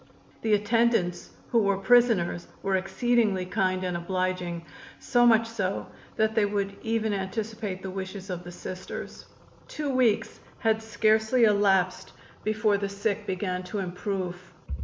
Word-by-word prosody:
The 220 -2 +3
attendants, 210 -4 +1 0.2
who 235 - +4
were 200 -1 +2
prisoners, 195 -5 +3 0.2
were 195 -1 +1
exceedingly 195 +1 +1
kind 185 0 0
and 180 -1 -2
obliging, 180 -1 -2 0.3
so 240 -2 +3
much 225 -1 +5
so 200 -4 -2 0.3
that 220 0 +2
they 220 -1 +3
would 200 -1 -1
even 220 -1 0
anticipate 205 0 -4
the 190 - -4
wishes 190 0 -6
of 180 -1 -5
the 175 - -8
Sisters. 185 +1 -7 0.4
Two 295 -2 -3
weeks 250 -5 +1 0.2
had 220 -1 +1
scarcely 220 +2 +2
elapsed 195 -4 +3 0.3
before 215 -1 +1
the 200 0 -2
sick 200 +1 -2
began 185 -1 -2
to 205 - -5
improve. 185 -1 -4
200 Hz, 140 wpm, -27 LUFS, 185-220 Hz, 0.4 s, much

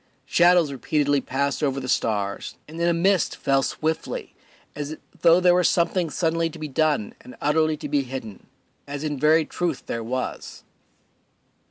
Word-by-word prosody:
Shadows 175 -3 +4
repeatedly 145 +2 +1
passed 140 +3 -1
over 140 -2 0
the 130 - -6
stars, 100 -5 -1
and 160 +2 -9
then 170 0 +2
a - - +4
mist 180 +2 +2
fell 135 0 +1
swiftly, 160 +4 -3 0.4
as 150 +1 -5 0.2
though 170 0 +6
there 180 -1 +5
were 180 0 +3
something 175 0 +2
suddenly 165 +1 0
to 165 - -11
be 155 -1 -5
done 150 -6 0
and 125 - -12
utterly 155 +1 +2
to - - -6
be 145 - +1
hidden, 125 -6 -8 0.4
as 145 +1 -5
in 150 -3 -3
very 155 +2 +4
truth 170 -6 -3
there 115 - -4
was. 125 +3 -5
150 Hz, 165 wpm, -24 LUFS, 135-165 Hz, 0.4 s, though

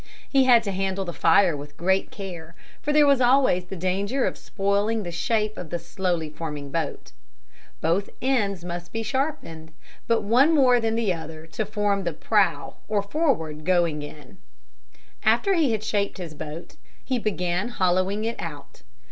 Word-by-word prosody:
He 270 -2 +3
had 240 -3 +6
to 200 - -2
handle 195 0 -2
the 175 - -5
fire 170 +1 +4
with 145 0 -9
great 190 +3 +1
care 170 -5 -8 0.3
for 295 - -1
there 300 0 +5
was 280 -2 +4
always 245 -8 +4
the 185 +2 -7
danger 195 +8 0
of - - -1
spoiling 205 +2 -1
the 175 - -5
shape 215 +5 -1
of 175 - -7
the 175 - -2
slowly 170 -1 -2
forming 150 -2 -6
boat. 155 - -3 0.7
Both 175 +5 +1
ends 205 -9 0
must 175 0 -6
be 225 0 -3
sharpened, 235 - -3 0.4
but 230 -2 +2
one 260 +10 +4
more 255 -4 +5
than 225 -1 0
the 225 -5 +1
other 160 -1 -8
to 195 +6 -4
form 205 -2 0
the 170 -2 -2
prow 205 +5 +1
or 210 -2 0
forward 200 - -1
going 170 -4 +1
end. 145 -2 -11 0.9
After 235 - +3
he 320 -8 +3
had 215 -1 -1
shaped 205 -1 -1
his 170 -4 -7
boat, 155 +2 -8 0.3
he 255 -2 0
began 185 -1 -1
hollowing 190 0 +1
it 230 +1 -3
out. 145 -4 -8
195 Hz, 170 wpm, -25 LUFS, 170-225 Hz, 0.9 s, had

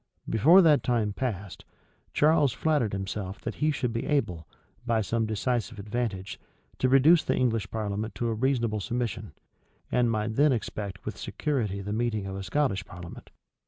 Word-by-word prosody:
Before 165 - +6
that 150 -5 +5
time 115 -3 0
elapsed, 100 -8 -4 0.5
Charles 150 -3 +3
flattered 150 -9 +1
himself 95 0 -4
that - - -4
he 155 - +3
should 130 -5 -1
be 115 - -3
able, 90 - -1 0.4
by 115 -2 +1
some 115 +2 -1
decisive 115 +1 -1
advantage, 105 -2 -4 0.4
to 130 - +2
reduce 145 +5 +6
the - - 0
English 115 -5 0
parliament 110 0 -3
to 120 - -1
a - - 0
reasonable 115 -2 0
submission, 120 +2 -3 0.6
and 125 -1 +3
might 110 0 -1
then 145 0 +5
expect 100 -4 -5
with - - -5
security 110 -10 -2
the 100 +1 -4
meeting 110 -3 -1
of 95 0 -5
a 100 - -5
Scottish 95 -3 0
parliament. 90 -3 -11
115 Hz, 160 wpm, -27 LUFS, 100-130 Hz, 0.6 s, Before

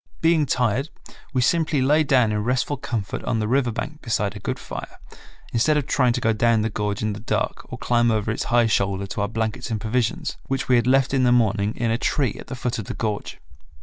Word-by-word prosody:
Being 160 -3 +3
tired 125 +4 +1 0.4
we 130 -3 +1
simply 155 +1 +2
lay 150 +4 +4
down 130 -6 +3
in 105 0 -1
restful 125 +4 0
comfort 115 -7 -4
on 115 - -1
the 110 -1 -1
river 125 0 +2
bank 150 +7 -5
beside 105 -4 -1
a - - -6
good - - -3
fire, - - -8 0.6
instead 150 +6 +3
of 145 - 0
trying 125 -3 +2
to - - -1
go 115 - +2
down 115 +1 +3
the 110 - -1
gorge 105 0 -2
in 110 -1 0
the 100 - -7
dark 110 - -3
or - - -5
climb 120 -1 +2
over 110 -1 0
its 110 - -2
high 120 0 +3
shoulder 100 -2 0
to 100 - -4
our 100 - +1
blankets 110 +3 -3
and 110 -2 -2
provisions, 125 - -1
which 135 0 -2
we 125 - +4
had 120 0 +2
left 135 0 +3
in 135 - +3
the 125 -1 +4
morning 110 -3 +2
in 115 -1 0
a 115 - 0
tree 135 -6 0
at - - -10
the - - -5
foot 125 -1 -2
of 105 - -5
the - - -5
gorge. 105 -2 -3
120 Hz, 240 wpm, -23 LUFS, 110-130 Hz, 0.6 s, lay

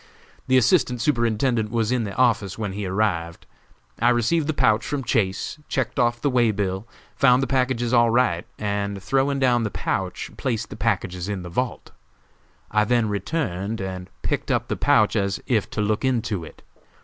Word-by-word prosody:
The 130 - +4
Assistant 125 -1 +3
Superintendent 115 -2 +1
was 115 0 0
in 125 -3 +1
the 100 - -6
office 115 -7 +1
when 105 -3 -3
he 100 0 -4
arrived. 90 -4 -1 0.6
I 120 - +5
received 125 +7 +2
the - - +2
pouch 120 -7 +2
from 145 -2 -3
Chase, 110 +2 -1
checked 130 -2 -2
off 120 -1 +1
the 145 - +2
way 120 -2 +3
bill, 100 0 -2 0.3
found 125 0 +4
the - - +2
packages 125 -3 0
all 120 -1 +5
right, 115 -8 +1
and 100 -1 -2
throwing 135 +1 +1
down 125 -3 +3
the 110 - -1
pouch, - - -3
placed 120 -5 -2
the - - -6
packages 90 +1 -1
in 100 -3 -3
the 90 - -7
vault. 125 +7 -3 0.8
I 105 0 +3
then 115 0 +1
returned 100 - -2
and 95 -1 -5
picked - - -2
up - - 0
the - - 0
pouch - - +3
as 100 0 0
if 110 -5 0
to 105 - -3
look 105 +3 0
into 115 -8 0
it. 80 - -13
115 Hz, 180 wpm, -23 LUFS, 100-125 Hz, 0.8 s, I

